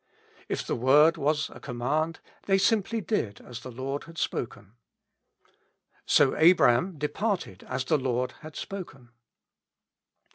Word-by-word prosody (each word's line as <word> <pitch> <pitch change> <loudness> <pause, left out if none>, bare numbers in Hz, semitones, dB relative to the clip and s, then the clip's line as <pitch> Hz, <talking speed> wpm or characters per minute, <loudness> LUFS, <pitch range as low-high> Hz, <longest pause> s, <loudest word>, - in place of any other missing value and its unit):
If - - -2
the - - -1
word 145 +7 +5
was 150 0 0
a - - -11
command, 145 +6 -2 0.3
they 195 -1 +4
simply 220 +2 +1
did 115 - -2
as 120 -1 -9
the 130 - -9
Loi'd 130 +3 -5
had 165 0 -13
spokeit: 115 - -3 1.4
"So 140 -2 +4
Abram 165 0 +4
departed 150 - -2
as 130 0 -3
the 155 +2 +2
Lord 125 -1 -1
had 155 -1 -10
spoken." 150 -11 -8
150 Hz, 130 wpm, -27 LUFS, 125-170 Hz, 1.4 s, word